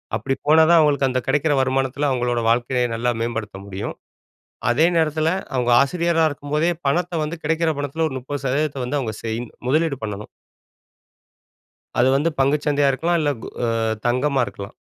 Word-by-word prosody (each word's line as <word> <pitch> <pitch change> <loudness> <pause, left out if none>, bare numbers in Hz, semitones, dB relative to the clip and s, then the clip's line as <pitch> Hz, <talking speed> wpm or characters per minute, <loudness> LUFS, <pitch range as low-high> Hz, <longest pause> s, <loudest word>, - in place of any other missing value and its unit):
அப்படி 135 - -1
போனா 160 +1 +6
தான் 170 -1 +7
அவுங்களுக்கு 140 -3 +3
அந்த 130 - 0
கிடைக்கிற 145 +2 +2
வருமானத்துல 135 +2 0
அவுங்களோட 120 -2 0
வாழ்க்கைய 125 +1 +1
நல்லா 120 +1 0
மேம்படுத்த 115 -4 -3
முடியும். 95 0 -5 0.8
அதே 155 +7 +4
நேரத்துல, 155 0 +1 0.3
அவுங்க 125 -1 +1
ஆசிரியரா 165 +3 +2
இருக்கும்போதே, 150 +4 -1 0.2
பணத்த 175 +5 0
வந்து 160 +3 -4
கிடைக்கிற 165 +1 +1
பணத்தில 145 +3 -1
ஒரு 130 - -7
30% 140 +3 -6
சதவீதத்த 140 -1 -1
வந்து 145 +4 -1
அவுங்க 115 -5 -3
செய் 110 +1 -2 0.3
முதலீடு 155 +1 +1
பண்ணணும். 105 -1 -5 1.7
அது 120 +2 +4
வந்து 150 +4 +2
பங்குச்சந்தையா 145 +1 +2
இருக்கலாம், 165 +6 0
அ - - 0
இல்ல 145 - +1
கோ - - -6 0.6
தங்கமா 135 +3 +1
இருக்கலாம். 100 0 -9
140 Hz, 155 wpm, -21 LUFS, 125-155 Hz, 1.7 s, தான்